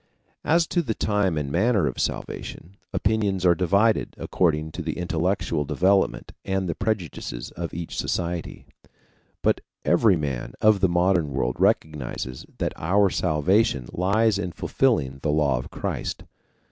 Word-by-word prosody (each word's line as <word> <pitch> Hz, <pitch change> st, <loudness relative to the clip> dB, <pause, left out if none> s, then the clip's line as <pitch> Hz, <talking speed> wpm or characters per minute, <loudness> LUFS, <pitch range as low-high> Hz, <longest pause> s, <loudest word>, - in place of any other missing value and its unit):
As 165 Hz, +2 st, +3 dB
to 175 Hz, -, 0 dB
the 115 Hz, -9 st, -2 dB
time 100 Hz, -6 st, +1 dB
and 70 Hz, -2 st, -2 dB
manner 105 Hz, +1 st, +2 dB
of 65 Hz, -, -3 dB
salvation, 90 Hz, +5 st, -4 dB, 0.2 s
opinions 100 Hz, -3 st, 0 dB
are 90 Hz, -, +6 dB
divided 100 Hz, +5 st, +2 dB
according 80 Hz, -3 st, 0 dB
to 90 Hz, -, -6 dB
the 80 Hz, -1 st, -4 dB
intellectual 90 Hz, -2 st, 0 dB
development 95 Hz, +7 st, +1 dB
and 95 Hz, -1 st, -1 dB
the 85 Hz, -, -1 dB
prejudices 90 Hz, -, -3 dB
of 85 Hz, -1 st, -5 dB
each 85 Hz, 0 st, -6 dB
society. 85 Hz, -1 st, -3 dB, 0.8 s
But -, -, +2 dB, 0.2 s
every 95 Hz, +3 st, +4 dB
man 65 Hz, -6 st, -4 dB
of 110 Hz, -2 st, +4 dB
the 95 Hz, -1 st, +3 dB
modern 85 Hz, -2 st, +2 dB
world 65 Hz, -2 st, -1 dB
recognizes 65 Hz, -4 st, -1 dB
that -, -, -1 dB
our 95 Hz, +4 st, +2 dB
salvation 85 Hz, -, +1 dB
lies 100 Hz, +3 st, +2 dB
in 90 Hz, -4 st, -3 dB
fulfilling 75 Hz, -, 0 dB
the 75 Hz, -, -1 dB
law 75 Hz, -4 st, +2 dB
of -, -, -8 dB
Christ. -, -, -4 dB
90 Hz, 145 wpm, -24 LUFS, 75-100 Hz, 0.8 s, are